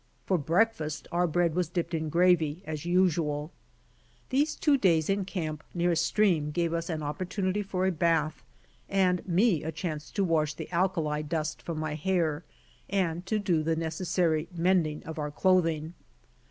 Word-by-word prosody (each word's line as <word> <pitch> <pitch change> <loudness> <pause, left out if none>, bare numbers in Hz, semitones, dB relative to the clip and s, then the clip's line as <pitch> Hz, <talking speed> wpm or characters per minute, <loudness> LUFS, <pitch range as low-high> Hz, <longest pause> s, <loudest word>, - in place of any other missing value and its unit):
For 185 -3 +1
breakfast 160 -1 0
our 175 +1 +2
bread 170 0 +1
was 175 -1 0
dipped 175 -1 -3
in 160 -1 -1
gravy 170 -1 +2
as 155 0 -5
usual! 165 -4 +1 0.8
These 290 +4 +1
two 295 -3 +3
days 175 - +3
in 195 -1 0
camp 155 -5 -4
near 175 0 +2
a - - +2
stream 170 -2 +2
gave 170 +2 -1
us 170 +1 -2
an 155 -2 -3
opportunity 185 +6 -2
for 190 -2 -2
a 190 - +3
bath, 160 -2 0 0.5
and 185 -2 +2
me 185 -2 +3
a 160 - -3
chance 155 -2 -5
to 200 - +1
wash 155 -4 +1
the 160 - -8
alkali 170 -4 0
dust 155 0 -3
from 165 -2 -5
my 155 -1 -2
hair, 160 -1 0 0.5
and 180 -2 -1
to 215 - +1
do 185 -6 +1
the 160 +1 0
necessary 165 0 0
mending 170 -3 +1
of 160 -1 -7
our 150 0 -2
clothing. 165 -1 +1
170 Hz, 165 wpm, -28 LUFS, 155-185 Hz, 0.8 s, two